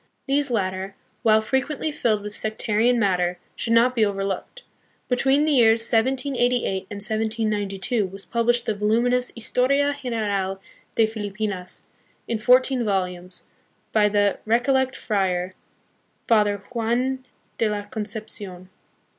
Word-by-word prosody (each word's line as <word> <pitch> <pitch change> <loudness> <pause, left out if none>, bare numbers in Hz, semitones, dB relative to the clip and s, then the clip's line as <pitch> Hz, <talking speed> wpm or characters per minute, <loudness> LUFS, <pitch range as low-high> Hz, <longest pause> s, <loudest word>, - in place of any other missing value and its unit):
These 280 +1 +1
latter, 190 -3 -2 0.3
while 220 -2 +4
frequently 270 +6 -1
filled 215 -7 0
with 210 0 -5
sectarian 220 +3 +1
matter, 180 -5 +1 0.2
should 230 - -1
not 240 +2 +5
be 230 -3 +2
overlooked. 195 - -3 0.4
Between 270 +4 +2
the 310 - +1
years 230 -4 +5
1788 245 -3 0
and 205 - -6
1792 215 -1 -1
was 195 +1 -10
published 235 0 +1
the - - 0
voluminous 235 +4 +1
Historia 275 +5 +1
General 205 -6 -1 0.4
de 225 - +5
Filipinas, 205 -3 -4 0.4
in 230 -2 -1
fourteen 255 +2 +4
vol 195 -4 +2
umes, 180 0 -9 0.5
by 210 -1 +4
the 205 -1 +2
Recollect 260 +3 +2
friar, 185 -4 -1 0.7
Father 210 -3 +3
Juan 245 +3 -1 0.4
de 225 - +2
la 205 -1 -2
Concep 215 +1 -4
cion. 185 -3 -9
220 Hz, 125 wpm, -23 LUFS, 200-245 Hz, 0.7 s, not